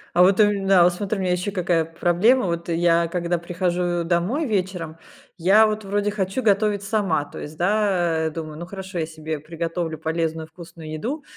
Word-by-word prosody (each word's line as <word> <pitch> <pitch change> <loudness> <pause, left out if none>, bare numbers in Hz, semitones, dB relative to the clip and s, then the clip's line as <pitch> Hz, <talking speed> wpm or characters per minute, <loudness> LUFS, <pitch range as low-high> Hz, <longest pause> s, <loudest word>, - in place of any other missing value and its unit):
А 180 - +7
вот, 190 +2 +4
у - - +7
ме 200 -1 -3
да, 190 -3 +6
вот 175 0 +4
смотри, 200 +2 -3
у - - -2
меня 185 -1 0
ещё 180 +3 -1
какая 175 -3 +1
проблема. 175 +9 +2
Вот, 170 0 -3
э, 170 - 0
я 170 0 +3
когда 170 0 -1
прихожу 175 0 -1
домой 180 - 0
вечером, 185 - -2 0.4
я 195 +6 +5
вот 215 0 -3
вроде 205 +1 0
хочу 195 +4 -2
готовить 205 -1 +2
сама. 195 -7 0
То - - -10
есть, 150 +1 -8
да, 180 -4 +1
э, - - -1
думаю: 155 -1 -7
"Ну, 170 - -6
хорошо, 190 -1 -6
я 160 - 0
себе 155 -1 -6
приготовлю 165 +1 -4
полезную, 160 0 -2
вкусную 160 -1 -11
еду". 270 - -4
175 Hz, 200 wpm, -23 LUFS, 165-200 Hz, 0.4 s, А